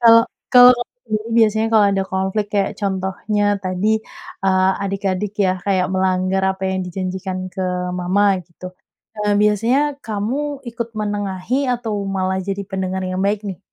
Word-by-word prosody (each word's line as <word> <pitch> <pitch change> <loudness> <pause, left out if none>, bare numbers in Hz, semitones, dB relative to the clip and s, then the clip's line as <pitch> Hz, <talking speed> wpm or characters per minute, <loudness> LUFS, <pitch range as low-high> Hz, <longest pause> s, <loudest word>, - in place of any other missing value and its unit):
Kalau 230 -1 +8 0.3
kalau 250 0 +10
ka 240 - -2 0.3
diri 215 +1 -1
biasanya 220 0 +3
kalau 210 -2 +6
ada 195 0 +1
konflik, 190 +2 0
kayak 200 -1 +1
contohnya 195 +2 -1 0.2
tadi, 185 +3 0 0.6
eee, 190 0 +3
adik-adik 195 0 -2
ya, 185 - +3
kayak 185 -2 +2
melanggar 185 0 +1
apa 190 0 -13
yang 190 0 -1
dijanjikan 185 +1 -4 0.2
ke 190 - -3 0.4
Mama, 190 +3 +2 0.2
gitu. 180 +1 -11 0.5
Eee, 210 0 0
biasanya 225 +6 +3 0.3
kamu 215 +5 -2 0.3
ikut 235 0 -4
menengahi 205 +3 -2 0.2
atau 230 -3 -4 0.2
malah 190 0 0
jadi 200 0 -2
pendengar 190 0 -2
yang 185 +1 -2
baik, 205 0 0
nih? 185 -5 -6
195 Hz, 150 wpm, -20 LUFS, 190-210 Hz, 0.6 s, kalau